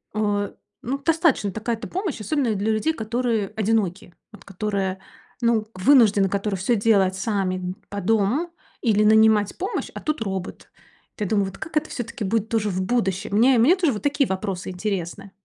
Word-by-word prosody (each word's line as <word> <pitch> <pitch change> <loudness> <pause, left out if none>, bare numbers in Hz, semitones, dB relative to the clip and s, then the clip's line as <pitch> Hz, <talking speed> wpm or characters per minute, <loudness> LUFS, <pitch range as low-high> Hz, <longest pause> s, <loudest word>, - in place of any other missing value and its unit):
а, 205 -1 -1 0.3
ну, 265 +2 -2
достаточно 310 - +1
такая-то 225 +2 -3
помощь, 370 - -3
особенно 235 +1 0
для 205 +3 0
людей, 220 +9 +1
которые 225 -4 -1
одиноки. 205 -5 -1 0.2
Вот 210 -3 -15
которые, 195 -1 -2 0.4
ну, 230 -2 +2
вынуждены 205 -2 +4
которые 200 0 -1
всё 215 +6 +1
делать 200 -3 +3
сами 190 -2 -1
д 180 0 -4 0.2
по 205 - -4
дому 225 - +1 0.3
или 215 -3 +3
нанимать 215 -1 +4
помощь, 390 +5 -3
а - - -6
тут 305 -5 -2
робот. 190 -4 -5 0.5
Эт - - -11
я - - +1
думаю, 200 0 +1
вот 195 - -9
как 320 - -8
это 305 0 -1
всё-таки 230 -2 -5
будет 220 +2 0
тоже 220 -2 0
в 185 -1 -2
будущем? 195 -3 -1
Мне 245 +4 +5
мне 260 +11 +5
тоже 350 -6 +1
вот 210 - -6
такие 285 -2 +2
вопросы 190 -1 -3
интересны. 190 0 -4
215 Hz, 175 wpm, -23 LUFS, 195-235 Hz, 0.5 s, Мне